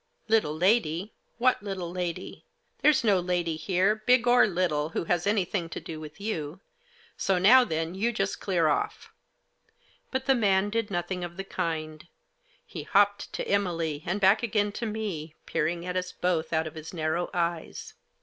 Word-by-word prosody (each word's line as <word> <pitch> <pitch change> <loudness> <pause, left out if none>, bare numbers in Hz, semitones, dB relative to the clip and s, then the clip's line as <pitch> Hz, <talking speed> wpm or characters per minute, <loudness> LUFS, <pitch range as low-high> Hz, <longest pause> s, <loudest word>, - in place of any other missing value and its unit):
" - - -44
Little 185 -9 +2
lady? 190 0 +1 0.2
What 250 +1 +2
little 190 -4 -4
lady? 175 -2 -5 0.4
There's 300 -4 +4
no 205 -4 +4
lady 175 -2 -1
here, 185 +5 +2
big 245 +3 +3
or 245 -2 +6
little, 170 -5 0
who 165 - -2
has 175 +2 0
anything 195 -4 0
to - - -5
do 160 -1 -7
with 155 +1 -10
you; 175 -6 -4 0.6
so, 190 - +1
now 240 +8 +7
then, 165 -5 -2
you 215 +5 0
just 195 -4 -2
clear 175 -5 +1
off." 150 - -2 1.0
But 260 0 -2
the 270 - +5
man 205 -4 +2
did 225 -1 -1
nothing 180 0 -3
of 175 0 -7
the 195 - -3
kind. 155 -4 -4 0.6
He - - -7
hopped 205 0 +2
to - - -3
Emily, 165 -7 0
and 190 +3 -2
back 195 +2 +5
again 210 -3 0
to 230 +3 -4
me, 195 -8 -4
peering 170 +2 -1
at 180 0 -4
us 185 0 -2
both 175 -3 -1
out 160 0 +1
of 155 - -6
his 160 +2 -9
narrow 160 +2 -1
eyes. 170 -2 -3
180 Hz, 175 wpm, -27 LUFS, 165-205 Hz, 1.0 s, now